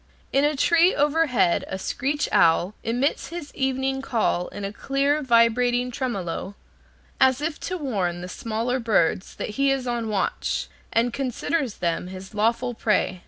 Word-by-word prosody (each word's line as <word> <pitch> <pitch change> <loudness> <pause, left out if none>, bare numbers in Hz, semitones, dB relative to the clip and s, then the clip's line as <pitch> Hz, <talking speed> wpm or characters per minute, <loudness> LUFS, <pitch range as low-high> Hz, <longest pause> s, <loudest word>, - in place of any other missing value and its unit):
In 275 - +4
a 295 +1 +2
tree 335 +5 +4
overhead 285 - +2
a 190 - -4
screech 280 +9 -1
owl 170 +4 +4
emits 250 +4 0
his 330 -1 -7
evening 265 0 -1
call 225 -9 0
in 205 -1 -6
a 200 - -5
clear, 280 +5 0
vibrating 245 0 +3
tremolo, 200 -6 -3 0.6
as 260 -1 +4
if 305 +1 -3
to 365 - -2
warn 195 - -2
the 180 - -6
smaller 230 +6 -2
birds 205 -6 +1
that - - -4
he 275 - +4
is 270 -2 0
on 240 -2 -2
watch, 215 - -1 0.2
and 235 +1 +1
considers 270 0 -2
them 170 0 -2
his 190 +2 -9
lawful 230 +4 +1
prey. 210 -5 0
245 Hz, 155 wpm, -24 LUFS, 205-275 Hz, 0.6 s, In